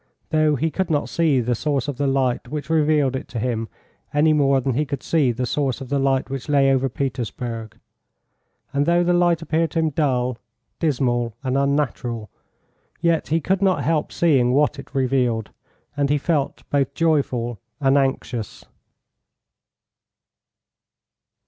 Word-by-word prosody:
Though 155 -1 +3
he 160 +4 -1
could 190 +2 -2
not 150 -2 0
see 155 -6 +2
the 120 +1 0
source 140 +2 -1
of 145 -4 -4
the 140 - 0
light 135 -2 0
which 150 +1 -5
revealed 150 -4 +2
it 130 - -5
to 120 - -5
him 115 -1 -2 0.4
any 155 +2 +3
more 140 -2 +3
than 130 0 -1
he 145 +6 +1
could 140 -2 -5
see 150 -7 +2
the 125 +2 -2
source 135 0 -1
of 135 -2 -8
the 140 - +1
light 135 -1 +1
which 135 +1 -6
lay 140 -2 +4
over 135 0 +1
Petersburg; 120 -4 -4 1.0
and 140 +1 +1
though 175 +1 +4
the 175 0 +2
light 175 -1 +2
appeared 165 0 0
to - - -5
him 160 -1 +1
dull, 125 -5 0 0.4
dismal, 120 -7 0
and 130 -1 -1
unnatural, 135 -6 -1 0.7
yet 170 -1 +1
he 160 +3 +1
could 190 +5 0
not 185 -8 +2
help 155 +2 0
seeing 135 -7 +3
what 150 +1 +2
it 140 - -12
revealed, 125 -4 0 0.4
and 140 -1 0
he 145 - +3
felt 145 -1 -1
both 140 -1 0
joyful 130 -8 0 0.2
and 135 -1 +3
anxious. 135 -5 -1
140 Hz, 160 wpm, -22 LUFS, 125-155 Hz, 1.0 s, lay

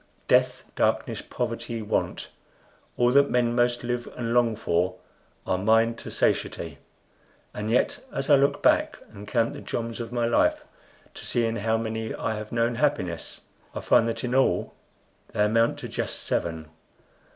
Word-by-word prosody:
Death, - - +3
darkness, - - 0
poverty, 115 -1 -4
want, 105 - -2 0.7
all 120 0 +4
that 140 +2 +5
men 120 -1 +2
most 120 0 +1
live 120 0 -3
and 115 -1 -2
long 120 -2 +3
for, 90 -3 0 0.5
are 90 - 0
mine 115 +3 +3
to - - -8
satiety; - - -1 0.7
and 105 +1 -4
yet, 120 - +1
as - - -3
I 145 - +7
look 140 +1 +2
back - - +3 0.2
and 105 0 -10
count 115 +1 +1
the - - -8
joms 115 0 -4
of 115 0 -5
my 120 -1 0
life 115 - +2 0.5
to - - -10
see 120 -1 +1
in 115 0 -1
how 110 +2 +1
many 110 0 -3
I 115 - -2
have 105 0 -6
known 115 0 +1
happiness, 90 - -1 0.3
I - - -3
find 115 - +4
that 115 - -3
in 125 0 -2
all 135 0 +2 0.6
they 105 - +2
amount 115 +2 +2
to - - -6
just - - -3
seven! 80 -2 -2
115 Hz, 165 wpm, -26 LUFS, 110-120 Hz, 0.7 s, I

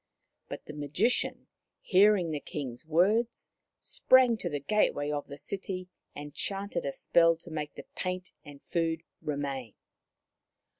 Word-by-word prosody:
But - - -7
the 150 - -8
Magician, 150 - 0 0.3
hearing 195 -3 +4
the 150 - -2
King's 135 -2 -6
words, 210 +9 +2 0.3
sprang 255 -2 +5
to 180 - -2
the 145 -2 -2
gateway 145 -3 +1
of 145 -1 -3
the 140 - -8
city 185 +1 -4 0.3
and 145 0 -7
chanted 200 0 -3
a - - 0
spell 165 +3 +4
to 165 +1 -11
make 150 -2 -4
the - - -9
paint 185 0 -3
and 145 -1 -13
food 165 -1 -1 0.2
remain. 140 -5 -3
165 Hz, 140 wpm, -30 LUFS, 145-195 Hz, 0.3 s, sprang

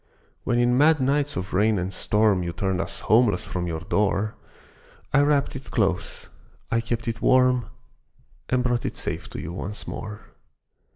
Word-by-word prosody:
When 120 - +1
in 120 +1 +3
mad 155 +1 +5
nights 140 +2 +1
of 90 +1 -4
rain 105 +3 +3
and 90 +1 -3
storm 105 -2 +2
You 85 -1 -3
turned 95 -1 -1
us - - -5
homeless 110 -4 +3
from 90 -1 -3
your 80 -1 -3
door, 105 +3 0 0.8
I 145 - +6
wrapped 145 -1 +2
it 135 - -8
close, 95 -6 -1 0.4
I 115 - +2
kept 115 0 -3
it 115 0 -3
warm, 125 -3 +4 0.8
And 125 -1 +2
brought 120 -1 0
it - - -5
safe - - -2
to - - -7
you 85 - -6
once 100 +3 -5
more. 105 -1 -6
110 Hz, 170 wpm, -24 LUFS, 95-125 Hz, 0.8 s, I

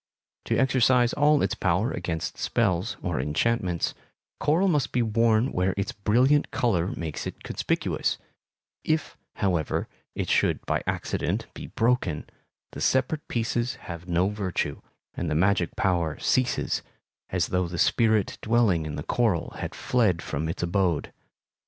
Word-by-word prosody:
To - - 0
exercise 125 -2 +3
all 150 0 +4
its 95 - +1
power 95 +7 +1
against 85 -2 -3
spells, 100 -2 0
or 85 -6 -1
enchantments, 85 - 0 0.5
coral 165 +7 +3
must 150 -7 +1
be 120 - +2
worn 115 +2 +2
where 90 +1 0
its 100 - -1
brilliant 125 +8 +3
color 95 -8 +1
makes 80 -4 -4
it - - -8
conspicuous; - - -1 0.7
if, 155 -1 -1 0.2
however, 90 -6 0 0.3
it - - -2
should - - +1
by - - 0
accident - - -1
be - - -8
broken, 115 -10 0 0.5
the - - -8
separate 130 +4 +1
pieces 120 +2 -1
have 85 0 -9
no 90 +2 +2
virtue, 95 -8 -2 0.3
and 85 - -3
the 75 - 0
magic 90 +1 +2
power 85 -5 0
ceases, 130 -1 +1 0.5
as 90 -1 0
though 90 -1 +1
the 85 +1 -5
spirit 110 +1 +2
dwelling 105 -9 +2
in 75 - -5
the 75 - -4
coral 110 -6 0
had - - -5
fled 105 -9 +1
from 80 +3 -3
its 85 - -3
abode. 85 -2 0
100 Hz, 145 wpm, -26 LUFS, 85-120 Hz, 0.7 s, all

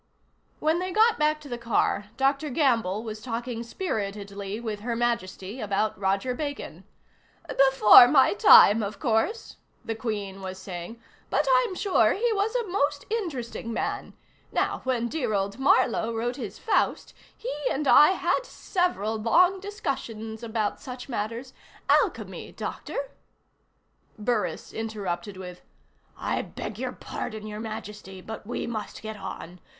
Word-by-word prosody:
When 315 +2 +2
they 370 +1 -3
got 440 +1 +4
back 305 0 +2
to 295 - -11
the 240 -3 -5
car, 230 -3 +1
Dr. 275 +3 +1
Gamble 230 - +1
was 215 -1 -6
talking 235 0 -4
spiritedly 205 - -4
with 220 -3 -4
Her 235 +2 -3
Majesty 230 -2 -2
about 210 0 0
Roger 195 +6 0
Bacon. 285 +2 -5 0.6
"Before 265 -3 +8
my 265 0 +5
time, 230 - +8
of 205 0 -4
course," 250 - 0 0.3
the 225 - -2
Queen 205 -4 -4
was 190 0 -6
saying, 190 +4 -7 0.3
"but - - +1
I'm 485 -6 0
sure 355 - +3
he 460 +3 +1
was 420 +3 0
a 475 -3 0
most 290 -6 0
interesting 270 - -3
man. 230 - -3 0.4
Now - - 0
when 245 -2 0
dear 245 -6 -1
old 200 +4 -2
Marlowe 250 -4 +3
wrote 240 +2 -2
his 220 -6 -6
Faust, - - 0 0.2
he - - -4 0.2
and 285 +1 -1
I 300 +7 +8
had 440 - 0
several 355 - -1
long 355 - +4
discussions 250 - -5
about 220 -2 -2
such 250 -1 -8
matters. 230 +2 -4 0.4
Alchemy, - - +1
Doctor - - -5 0.5
" - - -41
Burris 235 -4 -1
interrupted 200 -4 -4
with: 180 -1 -9 0.6
"I - - -1
beg 210 0 -7
your 255 0 -2
pardon, 215 -3 -6
Your 210 0 -6
Majesty, 210 -3 -7
but 215 +2 -8
we 245 - -3
must 215 -3 -5
get 220 0 -5
on. 180 -2 -8
230 Hz, 145 wpm, -26 LUFS, 210-285 Hz, 0.6 s, Before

